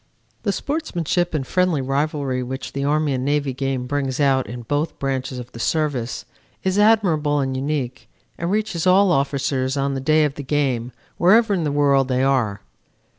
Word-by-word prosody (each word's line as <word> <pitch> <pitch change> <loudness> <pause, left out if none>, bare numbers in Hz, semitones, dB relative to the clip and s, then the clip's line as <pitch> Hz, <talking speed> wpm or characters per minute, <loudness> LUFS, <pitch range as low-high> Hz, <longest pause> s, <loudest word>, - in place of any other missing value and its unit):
"The 200 - 0
sportsmanship 180 - -1
and 135 -3 -1
friendly 180 -1 +1
rivalry 135 -1 -1
which 130 +2 -5
the 140 - -2
Army 150 0 +1
and 130 -1 -2
Navy 145 -1 0
game 135 -1 -2
brings 135 0 -2
out 135 -4 +2
in 120 +3 -7
both 145 +6 -2
branches 135 -1 -3
of 125 0 -8
the 115 - -10
Service 135 -4 -1 0.4
is 190 +1 +1
admirable 175 -9 +3
and 135 -1 -1
unique 135 -2 -3 0.3
and 170 - -3
reaches 195 -4 -1
all 190 +1 +5
officers 135 -2 0
on 140 0 0
the 135 - -3
day 155 +3 +3
of 145 - -2
the 145 - -7
game 130 -4 -1 0.3
wherever 215 +4 +5
in 175 -5 0
the 145 - 0
world 140 -2 +3
they 130 0 +1
are. 120 -7 +1
140 Hz, 180 wpm, -21 LUFS, 130-160 Hz, 0.4 s, all